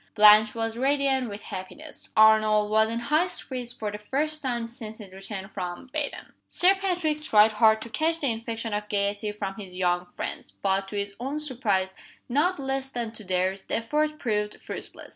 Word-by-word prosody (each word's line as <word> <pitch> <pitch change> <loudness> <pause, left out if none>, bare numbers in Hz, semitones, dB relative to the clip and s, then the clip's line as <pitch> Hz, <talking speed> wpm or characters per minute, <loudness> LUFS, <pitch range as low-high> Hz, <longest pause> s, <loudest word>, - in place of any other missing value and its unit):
Blanche 215 0 +7
was 225 0 -2
radiant 270 -1 +1
with 205 0 -7
happiness, 185 -2 -8
Arnold 215 -1 +5
was 220 0 +4
in 230 - -2
high 300 +9 +2
spirits 250 -8 -3
for 220 -4 -4
the 210 - -6
first 300 +8 -2
time 240 -3 -1
since 230 -2 -7
his 205 -4 -11
return 195 0 -6
from 180 -2 -5
Baden. 300 -2 -3
Sir 370 +2 +4
Patrick 355 -6 -1
tried 215 -7 +5
hard 220 0 +4
to - - -8
catch 320 +8 0
the 280 -5 +1
infection 225 0 -4
of 210 0 -3
gayety 205 +1 0
from 205 -2 -4
his 185 -3 -8
young 180 -1 +1
friends; - - -5
but, 195 0 -1
to 205 - -5
his 200 0 -3
own 275 +5 -3
surprise, 215 -10 -1 0.3
not 300 +7 +1
less 270 0 -2
than 240 -4 -4
to 220 -1 -9
theirs, 185 +1 -1
the - - -2
effort 300 +6 0
proved 210 -6 -2
fruitless. - - -8
220 Hz, 185 wpm, -26 LUFS, 205-270 Hz, 0.3 s, Blanche